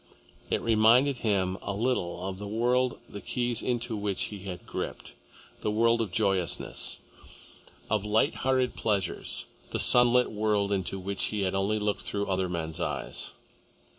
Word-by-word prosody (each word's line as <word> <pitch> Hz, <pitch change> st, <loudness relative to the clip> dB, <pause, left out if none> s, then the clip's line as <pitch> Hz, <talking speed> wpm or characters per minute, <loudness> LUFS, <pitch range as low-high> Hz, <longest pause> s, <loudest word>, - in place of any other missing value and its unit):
It -, -, 0 dB
reminded 115 Hz, +5 st, +5 dB
him 95 Hz, -5 st, 0 dB
a 100 Hz, -, -3 dB
little 95 Hz, -5 st, -1 dB
of 95 Hz, 0 st, -5 dB
the 105 Hz, -, -5 dB
world 125 Hz, +4 st, +1 dB
the 100 Hz, -, -8 dB
keys 120 Hz, -2 st, -1 dB
into 120 Hz, -2 st, -1 dB
which 100 Hz, -2 st, -1 dB
he 100 Hz, -, -6 dB
had 90 Hz, -2 st, -6 dB
gripped -, -, -5 dB, 0.5 s
the -, -, 0 dB
world 115 Hz, +2 st, +3 dB
of 110 Hz, -5 st, -2 dB
joyousness, 95 Hz, -3 st, 0 dB, 0.9 s
of 105 Hz, -2 st, 0 dB
light 105 Hz, +1 st, +2 dB
hearted 130 Hz, -1 st, +1 dB
pleasures, 100 Hz, -5 st, -1 dB, 0.2 s
the -, -, -2 dB
sunlit 125 Hz, 0 st, +5 dB
world 105 Hz, -1 st, +1 dB
into 95 Hz, -1 st, -1 dB
which 95 Hz, +1 st, -2 dB
he 105 Hz, -2 st, -2 dB
had 95 Hz, -1 st, 0 dB
only 100 Hz, +2 st, +1 dB
looked 105 Hz, -1 st, -1 dB
through 100 Hz, 0 st, -2 dB
other 95 Hz, -1 st, 0 dB
men's 80 Hz, -1 st, -3 dB
eyes. 85 Hz, -, -4 dB
105 Hz, 155 wpm, -28 LUFS, 95-115 Hz, 0.9 s, reminded